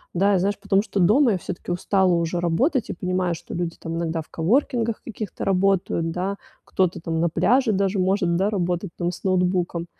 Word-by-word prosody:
Да 200 +3 +3
и, - - +2
знаешь, 200 +2 0
потому 195 0 +2
что 200 -2 -3
дома 230 +7 +5
я 190 - 0
всё-таки 175 0 -6
устала 185 +1 +2
уже 170 +1 -1
работать 230 - +1
и - - -2
понимаю, 180 -1 -1
что - - -10
люди 170 -1 -3
там 165 0 -6
иногда 165 -1 -2
в - - -16
коворкингах 230 - 0
каких-то 215 -3 -6
работают, 185 -3 +1
да, 190 +4 -3 0.3
кто-то 185 -2 0
там 165 -1 -2
на 170 +1 +2
пляже 240 +6 +2
даже 195 0 0
может, 185 -2 +1
да, 195 +3 +1
работать 180 -2 -1
там 175 0 -1
с 180 - -11
ноутбуком. 180 -2 0
185 Hz, 200 wpm, -23 LUFS, 170-200 Hz, 0.3 s, дома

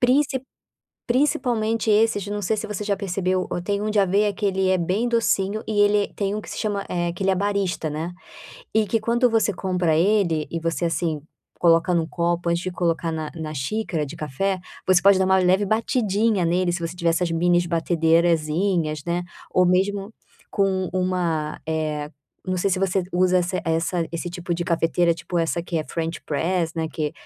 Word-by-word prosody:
Princip 265 +1 +2 0.6
principalmente 235 -4 +1
esses 210 -1 +3
não 205 0 -3
sei 210 +3 0
se 215 - -4
você 210 0 -4
já 200 -1 0
percebeu, 185 -1 -1
o - - -2
tem 200 +3 -2
um 215 - -1
de 210 - 0
aveia 200 +2 +3
que 205 +1 -2
ele 190 -1 +1
é 185 - +3
bem 195 +8 0
docinho 215 -2 +1
e 210 -1 -1
ele 205 0 +3
tem 200 0 -1
um 215 - -2
que - - -13
se - - -6
chama, 205 -2 -2
eh, 175 -1 -1
que 190 - -5
ele 195 - +3
é - - +3
barista, 195 -5 -1
né. 160 +4 -4 0.6
E 220 -1 +3
que 225 +3 0
quando 235 +3 +2
você 220 -2 +2
compra 180 -4 0
ele, 170 -4 +2
e 165 - -3
você, 165 +1 -1
assim, 165 -2 -1 0.4
coloca 170 +1 +4
em 175 - +3
um 160 - -1
copo, 170 0 -1
antes 170 +1 0
de 185 - -3
colocar 170 -2 -1
na 155 -1 -4
na 155 -2 -5
xícara 160 +3 -2
de - - -8
café, 185 +7 -2 0.3
você 185 -1 +5
pode 200 -1 +6
dar 190 - +3
uma 190 0 +4
leve 185 +2 +3
batidinha 220 -2 +1
nele, 175 +2 +1
se 175 - -3
você 165 - -7
tiver 170 -1 +1
essas 170 +1 0
mini 175 +1 +2
batedeirazinha, 165 0 +2
né, 175 +1 0 0.3
ou 185 - +3
mesmo 195 +3 +1 0.4
com 200 - +2 0.3
um 185 - +1
uma 165 -4 -1
eh, 155 -2 -2 0.4
não 185 0 -1
sei 195 - +1
se 185 - +1
você 190 0 +1
usa 185 +1 +3
essa 180 +1 -1
essa 165 +1 0
esse 170 +1 -3
tipo 175 -1 -3
de 175 +1 -3
cafeteira, 170 0 +2
tipo 175 +1 -4
essa 165 +1 0
que 170 -1 -2
é - - -1
French 165 0 -4
press, 165 +2 -1
né, 160 -1 -1
que 150 -2 -2
180 Hz, 205 wpm, -23 LUFS, 165-205 Hz, 0.6 s, pode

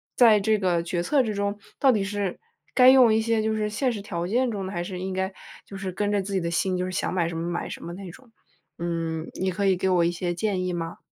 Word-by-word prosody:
在 225 -4 +6
这 215 +2 +2
个 180 -4 +1
决 175 0 -2
策 280 +7 +3
之 215 -2 -2
中 200 +1 -2 0.2
到 270 -2 +5
底 210 -4 +1
是 200 -2 -3 0.3
该 255 0 +7
用 255 -4 +7
一 220 - +3
些 225 -1 +1
就 220 0 0
是 210 -1 -1
现 250 +4 0
实 205 - -5
条 175 -4 -4
件 245 +4 +1
中 200 -4 -3
的， 190 - -5
还 175 0 -2
是 180 0 -6
应 190 0 -4
该 190 +1 -1 0.3
就 195 - -9
是 190 -1 -4
跟 205 +3 -1
着 205 -1 +1
自 200 +1 -5
己 190 - +2
的 170 - -2
心， 185 +2 0
就 180 - -1
是 185 - -4
想 185 - -2
买 170 -2 +1
什 165 - -5
么 165 +1 -3
买 175 - -3
什 - - -8
么 170 - -6
那 190 -1 -8
种。 240 +4 -17 0.5
嗯， 165 -1 -2
你 190 0 0
可 200 +2 -1
以 185 -2 +3
给 190 - 0
我 175 -2 +3
一 170 - +2
些 175 0 -2
建 185 -1 -1
议 180 - -2
吗？ 165 -1 -4
190 Hz, 300 characters per minute, -25 LUFS, 175-215 Hz, 0.5 s, 该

